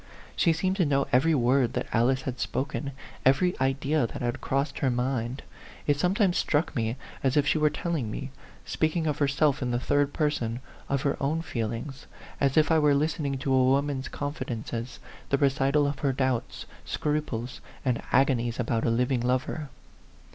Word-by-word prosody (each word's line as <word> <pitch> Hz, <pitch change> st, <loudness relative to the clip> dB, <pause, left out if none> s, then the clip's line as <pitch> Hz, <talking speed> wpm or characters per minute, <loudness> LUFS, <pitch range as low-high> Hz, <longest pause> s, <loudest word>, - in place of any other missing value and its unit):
She 170 Hz, -, +3 dB
seemed 185 Hz, +4 st, 0 dB
to 185 Hz, -, +3 dB
know 140 Hz, -1 st, +2 dB
every 155 Hz, +6 st, +4 dB
word 125 Hz, -1 st, +2 dB
that -, -, -1 dB
Alice 130 Hz, +3 st, +2 dB
had 130 Hz, -1 st, -4 dB
spoken, 140 Hz, +1 st, -2 dB, 0.3 s
every 180 Hz, +8 st, +4 dB
idea 135 Hz, 0 st, +1 dB
that -, -, -7 dB
had 120 Hz, +3 st, -2 dB
crossed 140 Hz, +2 st, -1 dB
her 135 Hz, -, +2 dB
mind. 125 Hz, 0 st, -1 dB, 0.4 s
It 145 Hz, -1 st, +2 dB
sometimes 185 Hz, +2 st, +2 dB
struck 155 Hz, +1 st, 0 dB
me 115 Hz, -1 st, 0 dB, 0.3 s
as 135 Hz, +1 st, +2 dB
if 145 Hz, -, +4 dB
she 155 Hz, -, +2 dB
were 150 Hz, 0 st, +4 dB
telling 155 Hz, -8 st, -2 dB
me, 135 Hz, +5 st, -5 dB, 0.3 s
speaking 160 Hz, +1 st, 0 dB
of 150 Hz, -2 st, -1 dB
her 145 Hz, -, +3 dB
self 140 Hz, 0 st, +2 dB
in 125 Hz, -, -1 dB
the 120 Hz, 0 st, 0 dB
third 145 Hz, +2 st, +1 dB
person, 125 Hz, -7 st, -1 dB, 0.3 s
of 140 Hz, -1 st, 0 dB
her 140 Hz, -, 0 dB
own 155 Hz, +4 st, 0 dB
feelings 120 Hz, +1 st, -4 dB, 0.3 s
as 140 Hz, 0 st, +1 dB
if 155 Hz, +1 st, +4 dB
I 160 Hz, -, +5 dB
were 150 Hz, -2 st, +4 dB
listening 145 Hz, -2 st, 0 dB
to 135 Hz, +1 st, -1 dB
a 130 Hz, -1 st, +5 dB
woman's 135 Hz, +1 st, +1 dB
con 145 Hz, 0 st, -4 dB
fidences, 120 Hz, -2 st, -5 dB, 0.3 s
the 140 Hz, -, +3 dB
recital 140 Hz, +1 st, +2 dB
of 140 Hz, -1 st, -2 dB
her 140 Hz, -2 st, +1 dB
doubts, 130 Hz, -2 st, -1 dB, 0.2 s
scruples, 150 Hz, -6 st, -3 dB, 0.2 s
and 125 Hz, -3 st, +1 dB
agonies 125 Hz, -3 st, +2 dB
about 115 Hz, -2 st, 0 dB
a -, -, +2 dB
living 125 Hz, +2 st, +1 dB
lover. 130 Hz, +4 st, -1 dB
135 Hz, 180 wpm, -27 LUFS, 125-150 Hz, 0.4 s, I